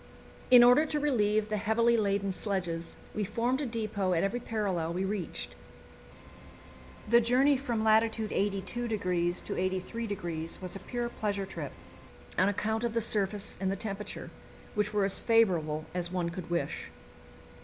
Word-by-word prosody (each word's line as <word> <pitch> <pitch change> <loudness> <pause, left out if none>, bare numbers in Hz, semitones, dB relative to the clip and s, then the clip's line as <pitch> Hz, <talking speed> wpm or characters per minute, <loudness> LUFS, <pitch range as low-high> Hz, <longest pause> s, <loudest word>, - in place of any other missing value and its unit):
In 250 -1 +9
order 250 +6 +6
to 300 - 0
relieve 215 -7 +2
the 215 - 0
heavily 230 +3 +3
laden 200 -2 +1
sledges, 180 -4 -3 0.2
we 215 - -1
formed 240 +7 0
a 285 - -1
depot 215 -5 -1
at 165 - +2
every 195 +5 0
parallel 195 -8 -2
we 185 +2 -1
reached. 195 -3 -3 1.5
The 235 +2 +6
journey 260 +5 +4
from 240 -5 -1
lat. 220 0 +6
82° 210 -3 -1 0.8
to - - -4
83° 185 -3 -3
was 185 -1 -5
a - - -5
pure 240 +2 -3
pleasure 205 -4 -2
trip, 190 - -6 0.6
on 190 - +4
account 220 +3 -1
of 235 -1 -1
the - - +3
surface 210 -2 -1
and 190 0 +1
the - - -1
temperature, 210 0 -5 0.4
which 210 0 0
were 205 -2 +2
as 195 - -1
favourable 170 -10 +2
as 175 -1 -2
one 175 -2 -1
could 175 -1 -7
wish. 170 0 -2
210 Hz, 155 wpm, -30 LUFS, 190-230 Hz, 1.5 s, In